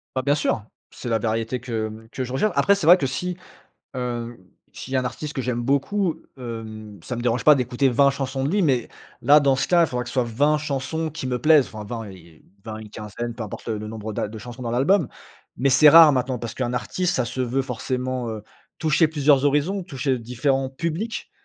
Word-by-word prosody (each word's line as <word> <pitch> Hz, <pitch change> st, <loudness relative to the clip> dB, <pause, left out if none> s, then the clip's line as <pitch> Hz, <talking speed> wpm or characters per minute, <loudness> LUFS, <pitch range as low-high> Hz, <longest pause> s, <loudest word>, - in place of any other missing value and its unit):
Bah, 130 Hz, -, +1 dB
bien 145 Hz, +1 st, +3 dB
sûr, 130 Hz, -7 st, -1 dB, 0.3 s
c'est 120 Hz, -, -7 dB
la 115 Hz, -1 st, +1 dB
variété 115 Hz, +3 st, -1 dB
que, 115 Hz, -2 st, -3 dB
hem, 110 Hz, +1 st, -11 dB
que 130 Hz, -, -3 dB
je 125 Hz, 0 st, -6 dB
recherche. 210 Hz, +11 st, +1 dB
Après, 200 Hz, -, +4 dB
c'est 175 Hz, -6 st, -3 dB
vrai 175 Hz, +2 st, +9 dB
que 140 Hz, -, -2 dB
si, 180 Hz, +7 st, -3 dB, 0.6 s
hem, 120 Hz, -2 st, -4 dB, 0.4 s
s'il 135 Hz, -, -7 dB
y -, -, +3 dB
a -, -, +3 dB
un -, -, -4 dB
artiste 145 Hz, +4 st, -5 dB
que 130 Hz, -, -2 dB
j'aime 125 Hz, -1 st, -2 dB
beaucoup, 155 Hz, +7 st, 0 dB, 0.2 s
hem, 110 Hz, -4 st, -8 dB
ça 125 Hz, -, -5 dB
me 120 Hz, -, -4 dB
dérange 120 Hz, 0 st, 0 dB
pas 150 Hz, -, +8 dB
d'écouter 125 Hz, 0 st, +1 dB
20 140 Hz, +3 st, +4 dB
chansons 135 Hz, -1 st, -3 dB
de 140 Hz, -, 0 dB
lui 200 Hz, +2 st, +2 dB
mais 130 Hz, -7 st, +1 dB, 0.3 s
là, 145 Hz, +5 st, +6 dB
dans 140 Hz, -2 st, +3 dB
ce -, -, -1 dB
cas, 175 Hz, -1 st, +5 dB
il -, -, 0 dB
faudra 125 Hz, -3 st, -3 dB
que -, -, -9 dB
ce -, -, -8 dB
soit 130 Hz, -2 st, +2 dB
20 145 Hz, +7 st, +1 dB
chansons 150 Hz, +2 st, -3 dB
qui 155 Hz, -3 st, -6 dB
me 125 Hz, -1 st, -1 dB
plaisent, 150 Hz, -2 st, +5 dB
enfin 105 Hz, -1 st, -7 dB
20, 115 Hz, 0 st, -6 dB
y -, -, -11 dB
y 90 Hz, -, -15 dB, 0.2 s
y -, -, -27 dB, 0.2 s
20, 110 Hz, -1 st, -6 dB
une 110 Hz, -1 st, -10 dB
quinzaine, 110 Hz, +3 st, -6 dB
peu 115 Hz, -, -6 dB
importe 105 Hz, -, -8 dB
le 110 Hz, -2 st, -1 dB
le 105 Hz, 0 st, -6 dB
nombre 110 Hz, 0 st, -6 dB
d'a 105 Hz, -, -2 dB
de 110 Hz, +1 st, -8 dB
chansons 120 Hz, +3 st, -9 dB
dans 120 Hz, -, -3 dB
l'album. 140 Hz, +6 st, +2 dB, 0.5 s
Mais 135 Hz, +3 st, +1 dB
c'est 135 Hz, +4 st, +7 dB
rare 165 Hz, -1 st, +9 dB
maintenant, 130 Hz, -1 st, -1 dB
parce 115 Hz, -1 st, -6 dB
qu'un 125 Hz, -2 st, -2 dB
artiste 125 Hz, -, -1 dB
ça 125 Hz, -, +1 dB
se 130 Hz, +2 st, -5 dB
veut 125 Hz, +2 st, 0 dB
forcément, 130 Hz, 0 st, -3 dB
heu, 110 Hz, -1 st, -6 dB, 0.4 s
toucher 160 Hz, 0 st, +3 dB
plusieurs 145 Hz, -3 st, +3 dB
horizons, 150 Hz, +8 st, +1 dB
toucher 135 Hz, -6 st, -2 dB
différents 130 Hz, +3 st, -1 dB
publics. 170 Hz, +10 st, -4 dB
130 Hz, 240 wpm, -23 LUFS, 115-145 Hz, 0.6 s, vrai